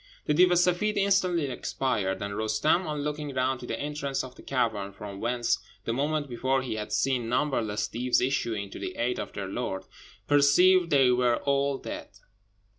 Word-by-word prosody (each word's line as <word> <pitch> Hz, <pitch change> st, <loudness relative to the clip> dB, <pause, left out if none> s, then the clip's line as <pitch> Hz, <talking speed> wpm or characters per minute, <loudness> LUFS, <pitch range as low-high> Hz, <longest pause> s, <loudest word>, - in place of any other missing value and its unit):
The 150 Hz, -, +2 dB
Deev 180 Hz, +4 st, +5 dB
e -, -, +3 dB
Seffeed 180 Hz, +4 st, +2 dB
instantly 190 Hz, -5 st, +2 dB
expired; 125 Hz, -7 st, -2 dB
and 100 Hz, 0 st, -4 dB
Roostem, 110 Hz, -, +1 dB
on 150 Hz, -1 st, -3 dB
looking 150 Hz, -2 st, -4 dB
round 130 Hz, 0 st, 0 dB
to 125 Hz, -, -8 dB
the -, -, -3 dB
entrance 140 Hz, -2 st, -2 dB
of 130 Hz, -1 st, -9 dB
the -, -, -14 dB
cavern, 110 Hz, -7 st, -1 dB
from 100 Hz, -1 st, -8 dB
whence 120 Hz, +2 st, 0 dB, 0.3 s
the 115 Hz, -, -1 dB
moment 145 Hz, +3 st, -1 dB
before 130 Hz, +2 st, 0 dB
he 130 Hz, -, -3 dB
had 105 Hz, -1 st, -5 dB
seen 120 Hz, +3 st, 0 dB
numberless 120 Hz, -6 st, 0 dB
Deevs 125 Hz, +2 st, +1 dB
issuing 115 Hz, -6 st, -1 dB
to -, -, -8 dB
the -, -, -5 dB
aid 125 Hz, +1 st, -1 dB
of -, -, -5 dB
their 100 Hz, -2 st, -4 dB
lord, 95 Hz, -2 st, -3 dB, 0.4 s
perceived 170 Hz, +5 st, +5 dB
they 135 Hz, -4 st, +5 dB
were 125 Hz, -1 st, +3 dB
all 140 Hz, 0 st, +1 dB
dead. -, -, -7 dB
130 Hz, 185 wpm, -28 LUFS, 115-150 Hz, 0.4 s, Deev